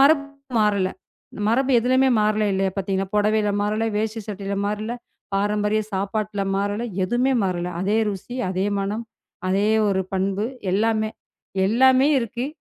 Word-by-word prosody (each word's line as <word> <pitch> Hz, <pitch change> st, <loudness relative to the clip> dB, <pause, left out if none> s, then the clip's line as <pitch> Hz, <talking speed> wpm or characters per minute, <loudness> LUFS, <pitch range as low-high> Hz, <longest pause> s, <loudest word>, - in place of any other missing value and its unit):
மரபு 285 Hz, +1 st, +6 dB, 0.4 s
மாறவில்லை. 200 Hz, -3 st, +2 dB, 0.6 s
மரபு 265 Hz, +4 st, +2 dB
எதுலையுமே 260 Hz, +2 st, +3 dB
மாறவில்லை 210 Hz, 0 st, +2 dB
இல்லையா? 190 Hz, 0 st, +1 dB
பார்த்தீங்கன்னா, 195 Hz, 0 st, -1 dB
புடவையில் 210 Hz, -1 st, +2 dB
மாறவில்லை, 215 Hz, +2 st, 0 dB
வேஷ்டி 220 Hz, +1 st, -1 dB
சட்டையில் 200 Hz, -1 st, -3 dB
மாறவில்லை, 215 Hz, +3 st, -3 dB, 0.4 s
பாரம்பரிய 210 Hz, +1 st, +1 dB
சாப்பாட்டுல 200 Hz, +1 st, -2 dB
மாறவில்லை, 205 Hz, +4 st, -1 dB, 0.2 s
எதுவுமே 245 Hz, +7 st, +1 dB
மாறவில்லை. 180 Hz, -2 st, -1 dB
அதே 205 Hz, +4 st, +1 dB
ருசி, 205 Hz, +6 st, -7 dB
அதே 190 Hz, +1 st, 0 dB
மணம், 205 Hz, +4 st, -2 dB, 0.4 s
அதே 200 Hz, +3 st, +2 dB, 0.2 s
ஒரு 190 Hz, -1 st, +1 dB
பண்பு. 195 Hz, +3 st, 0 dB, 0.3 s
எல்லாமே, 215 Hz, +1 st, +1 dB, 0.6 s
எல்லாமே 260 Hz, +5 st, +5 dB
இருக்கு 240 Hz, +2 st, -3 dB
210 Hz, 130 wpm, -23 LUFS, 195-225 Hz, 0.6 s, மரபு